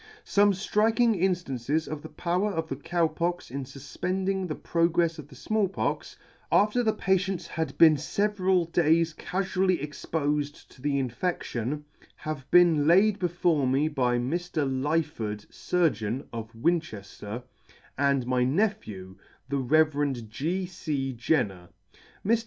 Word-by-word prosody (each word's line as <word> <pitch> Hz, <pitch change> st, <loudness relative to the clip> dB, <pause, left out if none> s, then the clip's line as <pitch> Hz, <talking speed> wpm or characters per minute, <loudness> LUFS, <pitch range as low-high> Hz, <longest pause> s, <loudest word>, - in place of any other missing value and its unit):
Some 205 Hz, 0 st, +4 dB
ftriking 220 Hz, +4 st, +2 dB
inftances 160 Hz, -5 st, 0 dB
of 155 Hz, -1 st, -5 dB
the 160 Hz, -, -9 dB
power 180 Hz, +4 st, -1 dB
of 165 Hz, -3 st, -2 dB
the 135 Hz, -, -2 dB
Cow 170 Hz, +4 st, 0 dB
Pox 170 Hz, -1 st, -3 dB
in 140 Hz, +1 st, -4 dB
fufpending 185 Hz, +8 st, -3 dB
the 155 Hz, -, -3 dB
progrefs 170 Hz, -1 st, +1 dB
of 145 Hz, -, -9 dB
the 145 Hz, -, -15 dB
Small 215 Hz, +8 st, 0 dB
Pox, 190 Hz, -, -3 dB, 0.3 s
after 210 Hz, +4 st, +4 dB
the 225 Hz, -2 st, +2 dB
patients 190 Hz, -3 st, 0 dB
had 160 Hz, -4 st, -4 dB
been 160 Hz, -2 st, +7 dB
feveral 190 Hz, +1 st, +1 dB
days 165 Hz, -1 st, +3 dB
cafually 185 Hz, +1 st, 0 dB
expofed 145 Hz, 0 st, -3 dB
to 130 Hz, -, -18 dB
the 140 Hz, 0 st, 0 dB
infedlion, 135 Hz, 0 st, -2 dB, 0.3 s
have 155 Hz, -3 st, -6 dB
been 165 Hz, -4 st, +5 dB
laid 200 Hz, +5 st, +5 dB
before 175 Hz, -5 st, +1 dB
me 135 Hz, +4 st, +2 dB
by 125 Hz, -5 st, +1 dB
Mr. 155 Hz, +3 st, -1 dB
Lyford, 130 Hz, -7 st, -1 dB
Surgeon, 130 Hz, -, 0 dB
of 115 Hz, -1 st, -6 dB
Winchefter, 115 Hz, -, -2 dB, 0.5 s
and 140 Hz, -2 st, +1 dB
my 125 Hz, 0 st, +1 dB
nephew, 130 Hz, -, -1 dB, 0.3 s
the 140 Hz, 0 st, 0 dB
Rev. 145 Hz, +1 st, +2 dB, 0.2 s
G. 170 Hz, +11 st, -2 dB
C. 150 Hz, -7 st, -3 dB
Jenrier. 105 Hz, -, -1 dB, 0.6 s
Mr. 225 Hz, +3 st, +3 dB
155 Hz, 135 wpm, -27 LUFS, 135-180 Hz, 0.6 s, been